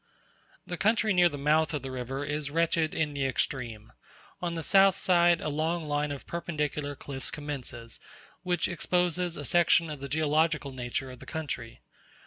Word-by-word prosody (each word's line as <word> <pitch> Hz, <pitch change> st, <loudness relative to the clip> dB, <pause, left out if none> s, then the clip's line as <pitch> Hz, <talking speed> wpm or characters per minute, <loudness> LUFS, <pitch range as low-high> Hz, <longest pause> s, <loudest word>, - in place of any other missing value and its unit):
The 175 Hz, -, -5 dB
country 215 Hz, 0 st, +3 dB
near 175 Hz, -1 st, +5 dB
the 145 Hz, -, -6 dB
mouth 155 Hz, +2 st, +2 dB
of 145 Hz, -, -4 dB
the 135 Hz, -, -5 dB
river 130 Hz, +2 st, -4 dB
is 145 Hz, 0 st, -2 dB
wretched 165 Hz, +1 st, +1 dB
in 150 Hz, -2 st, 0 dB
the 140 Hz, -1 st, -1 dB
extreme: 120 Hz, -4 st, -3 dB, 0.5 s
on 170 Hz, -1 st, -2 dB
the 165 Hz, -, -3 dB
south 195 Hz, +2 st, +5 dB
side 175 Hz, -2 st, +4 dB
a -, -, -3 dB
long 160 Hz, +2 st, -1 dB
line 145 Hz, 0 st, 0 dB
of 140 Hz, -, -6 dB
perpendicular 150 Hz, -4 st, -3 dB
cliffs 135 Hz, -1 st, -3 dB
commences, 130 Hz, -6 st, -6 dB, 0.4 s
which 175 Hz, -2 st, 0 dB
exposes 175 Hz, 0 st, 0 dB
a 145 Hz, -, -6 dB
section 170 Hz, 0 st, +3 dB
of 150 Hz, -, -6 dB
the 140 Hz, 0 st, -6 dB
geological 155 Hz, 0 st, +1 dB
nature 130 Hz, +1 st, -4 dB
of 125 Hz, -, -11 dB
the -, -, -12 dB
country. 125 Hz, -8 st, -5 dB
150 Hz, 170 wpm, -29 LUFS, 140-170 Hz, 0.5 s, near